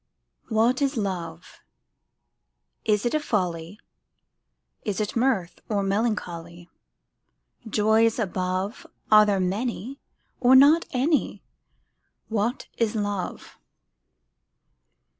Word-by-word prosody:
WHAT 230 +4 +2
is 275 -1 0
Love? 175 -5 -5 1.3
Is 210 0 +1
it 240 - 0
a 310 - +2
folly, 180 - -2 1.0
Is 205 -2 -3
it 210 -1 -2
mirth, 230 -8 0
or 205 -2 0
melancholy? 175 -5 -3 1.0
Joys 220 +2 +3
above, 185 -1 -3 0.2
Are 215 0 +7
there 200 -2 +1
many, 225 +7 -3 0.4
or 255 +1 +5
not 290 +5 +6
any? 285 +4 0 0.9
What 225 +3 -1
is 230 -1 +1
Love? 205 -3 -4
210 Hz, 90 wpm, -25 LUFS, 185-240 Hz, 1.3 s, Are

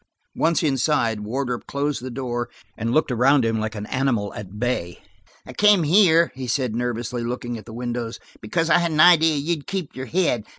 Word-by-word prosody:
Once 165 +1 +1
inside, 135 -6 +1
Wardrop 125 +3 -4
closed 140 -1 -2
the 130 - -6
door 120 -1 -4 0.3
and 115 +1 -3
looked 155 +1 +1
around 125 +2 +3
him 115 -1 0
like 110 +1 -3
an 105 0 -5
animal 120 -6 -1
at 105 0 -9
bay. 105 -7 -2 0.5
"I 130 - -10
came 205 +2 +4
here," 170 0 +4
he 130 -1 -6
said 125 -2 -1
nervously, 120 0 -3
looking 120 0 -4
at - - -14
the 115 - -11
windows, 120 -1 -4 0.2
"because 165 +10 -1
I - - +6
had 170 -1 0
an 155 -1 -2
idea 160 -1 +6
you'd 150 +1 -2
keep 195 -6 -4
your 130 0 -6
head. 160 - 0
125 Hz, 195 wpm, -22 LUFS, 115-155 Hz, 0.5 s, I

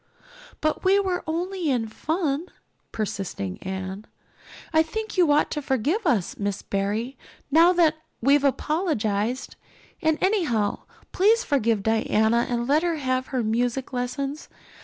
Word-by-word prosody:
"But 310 0 0
we 390 +2 +4
were 370 -3 -1
only 350 +1 -2
in 240 -4 0
fun," 310 - -2 0.4
persisted 195 - -4
Anne. 190 +2 -5 0.7
"I 315 - +6
think 435 +7 -4
you 350 -5 +4
ought 295 +1 +3
to 295 - -2
forgive 285 - 0
us, 205 -8 0
Miss 200 -1 -2
Barry, 210 +6 -2 0.3
now 330 +4 +6
that 325 -3 +3 0.2
we've 280 +3 +4
apologized. 255 - -1 0.4
And 315 -1 +2
anyhow, 300 - 0 0.3
please 440 +5 +3
forgive 230 -7 +1
Diana 220 +1 +2
and 240 -1 -1
let 295 +3 +4
her 345 -1 0
have 255 -3 -1
her 255 -3 -1
music 245 +4 -1
lessons. 275 +4 -3
270 Hz, 135 wpm, -25 LUFS, 220-320 Hz, 0.7 s, I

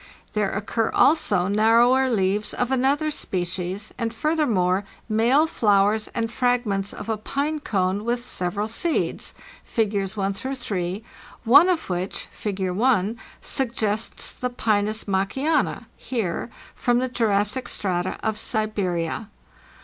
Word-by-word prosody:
There 210 -2 +1
occur 215 +3 -1
also 205 - +3
narrower 235 +5 +4
leaves 205 -2 0
of 250 +1 -1
another 275 +4 +2
species, 185 - -3
and 230 -1 -1
furthermore 225 - +1 0.2
male 235 +7 +3
flowers 210 -5 +2
and 230 0 -1
fragments 240 -6 0
of - - -8
a 220 -1 -1
pine 285 +8 -2
cone" 195 -5 0
with 240 +1 -1
several 200 -1 -2
seeds 315 +9 -1 0.3
(Figs. 205 -2 -1
1 195 0 0
3), 205 -5 -4 0.4
one 285 +10 +7
of 345 -3 0
which 180 +1 -3
(Fig. 190 -3 -3
1) 220 +1 +1 0.2
suggests 225 -4 -1
the 250 - -3
Pinus 215 -2 0
Maakiana 220 +11 0
(Heer) 225 -4 -3 0.2
from 245 -1 +1
the 255 +1 +1
Jurassic 220 0 0
strata 180 -2 -1
of 220 -1 -1
Siberia. 200 -3 -1
215 Hz, 120 wpm, -24 LUFS, 195-245 Hz, 0.4 s, one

